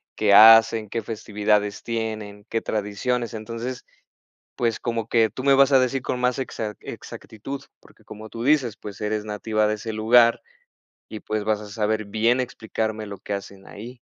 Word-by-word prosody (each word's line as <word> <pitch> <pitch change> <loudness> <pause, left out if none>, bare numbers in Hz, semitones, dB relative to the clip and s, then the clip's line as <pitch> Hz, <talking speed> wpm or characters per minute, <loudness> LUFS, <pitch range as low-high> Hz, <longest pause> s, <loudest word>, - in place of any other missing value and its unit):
¿Qué 105 -2 +2
hacen? 115 0 +7
¿Qué 115 +2 -2
festividades 105 -1 -1
tienen? 110 -3 -5
¿Qué 115 - -1
tradiciones?" 110 +3 -2
Entonces, 115 +3 -6 0.7
pues, 115 -2 -1
como 115 -2 -3
que 115 -2 +3
tú 130 - -7
me 140 -1 +5
vas 135 +1 +5
a 135 - +7
decir 130 +1 0
con 125 - -3
más 125 +1 +1
exac 110 -5 -5
exactitud, 130 +6 -8 0.2
porque, - - -22
como 110 +1 -10
tú 115 +2 -7
dices, 130 -5 +2
pues, 100 -2 -10
eres 105 0 -2
nativa 110 0 -1
de 110 - 0
ese 110 +1 -6
lugar 115 +2 +4 0.7
y 110 - -7
pues 110 -1 -3
vas 105 0 0
a 105 - -9
saber 110 0 -1
bien 110 +5 +1
explicarme 110 -3 -3
lo 100 -1 -8
que 100 - -6
hacen 100 -1 -7
ahí. 120 +4 -10
110 Hz, 175 wpm, -23 LUFS, 105-120 Hz, 0.7 s, hacen